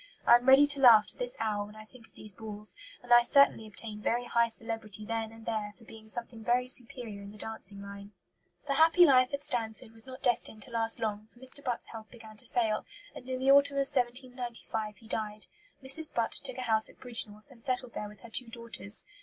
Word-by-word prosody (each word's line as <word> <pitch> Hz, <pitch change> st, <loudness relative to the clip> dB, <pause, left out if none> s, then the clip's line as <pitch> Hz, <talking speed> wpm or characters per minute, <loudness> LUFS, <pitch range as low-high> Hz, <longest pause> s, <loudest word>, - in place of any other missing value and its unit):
I -, -, +7 dB
am 245 Hz, +2 st, +1 dB
ready 270 Hz, +2 st, +8 dB
to 285 Hz, -1 st, +3 dB
laugh 235 Hz, -5 st, +8 dB
to -, -, -5 dB
this -, -, -2 dB
hour 210 Hz, -2 st, -1 dB
when 210 Hz, +1 st, -12 dB
I 215 Hz, 0 st, -11 dB
think 230 Hz, 0 st, -17 dB
of -, -, -20 dB
these 215 Hz, -2 st, -9 dB
balls, 210 Hz, 0 st, -6 dB, 0.3 s
and 245 Hz, 0 st, +2 dB
I 240 Hz, -, +9 dB
certainly 240 Hz, -3 st, +4 dB
obtained 210 Hz, 0 st, -4 dB
very 240 Hz, +3 st, 0 dB
high 235 Hz, -1 st, +2 dB
celebrity 225 Hz, -2 st, -6 dB
then 225 Hz, 0 st, -3 dB
and 225 Hz, 0 st, -14 dB
there 215 Hz, -2 st, -3 dB
for 235 Hz, -, -18 dB
being 220 Hz, -1 st, -14 dB
something 230 Hz, 0 st, -6 dB
very 245 Hz, +2 st, +1 dB
superior 240 Hz, -4 st, -2 dB
in 200 Hz, -, -9 dB
the 210 Hz, -, -13 dB
dancing 205 Hz, -2 st, -7 dB
line." 200 Hz, 0 st, -10 dB, 0.5 s
The 280 Hz, -, 0 dB
happy 330 Hz, +4 st, +6 dB
life 255 Hz, -3 st, +5 dB
at 280 Hz, 0 st, -4 dB
Stanford 225 Hz, -2 st, -2 dB
was 225 Hz, +2 st, -4 dB
not 260 Hz, 0 st, -10 dB
destined 225 Hz, -3 st, +1 dB
to 255 Hz, -, -13 dB
last 225 Hz, -1 st, +4 dB
long, 215 Hz, -1 st, -3 dB
for 240 Hz, -, -22 dB
Mr. 260 Hz, +2 st, -3 dB
Butt's 245 Hz, -2 st, -3 dB
health 220 Hz, -1 st, -10 dB
began 225 Hz, -3 st, -13 dB
to -, -, -5 dB
fail, 220 Hz, -3 st, 0 dB, 0.3 s
and 250 Hz, -, -10 dB
in 255 Hz, 0 st, -2 dB
the 265 Hz, +1 st, +4 dB
autumn 280 Hz, 0 st, +5 dB
of 275 Hz, -, +2 dB
1795 245 Hz, -4 st, -3 dB
he 225 Hz, -, -17 dB
died. 215 Hz, -1 st, -4 dB, 0.4 s
Mrs. 295 Hz, +4 st, +4 dB
Butt 230 Hz, -1 st, 0 dB
took 260 Hz, -1 st, -1 dB
a -, -, -4 dB
house 220 Hz, -3 st, +1 dB
at -, -, -19 dB
Bridgnorth, 225 Hz, -1 st, -2 dB
and 240 Hz, -3 st, -8 dB
settled 250 Hz, -1 st, -2 dB
there 210 Hz, -, -5 dB
with 210 Hz, -1 st, -16 dB
her 235 Hz, -, -13 dB
two 250 Hz, +2 st, -1 dB
daughters. 230 Hz, -3 st, -7 dB
230 Hz, 230 wpm, -30 LUFS, 215-255 Hz, 0.5 s, I